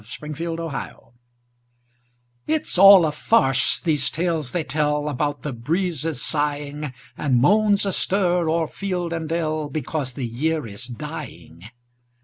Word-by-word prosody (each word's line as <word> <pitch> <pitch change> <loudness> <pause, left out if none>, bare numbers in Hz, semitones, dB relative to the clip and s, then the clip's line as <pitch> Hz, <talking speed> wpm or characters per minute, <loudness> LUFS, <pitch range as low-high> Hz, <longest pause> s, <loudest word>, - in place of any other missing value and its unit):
MERRY 155 +2 -5
AUTUMN 165 -6 -5 1.5
It's 315 -1 0
all 195 -3 +9
a 155 - 0
farce, 135 - +2
these 150 -5 0
tales 160 -5 -2
they 175 - -1
tell 150 -1 0
About 145 +1 -2
the 150 - -3
breezes 160 +2 -2
sighing, 145 -1 -2 0.2
And 130 -4 +1
moans 205 - +4
astir 180 -3 +1
o'er 165 0 +1
field 180 -3 -3
and 165 -2 -4
dell, 155 -2 -1
Because 145 -2 -3
the 130 0 -4
year 150 +6 -1
is 115 +3 -7
dying. 100 -6 -9
155 Hz, 125 wpm, -22 LUFS, 140-170 Hz, 1.5 s, all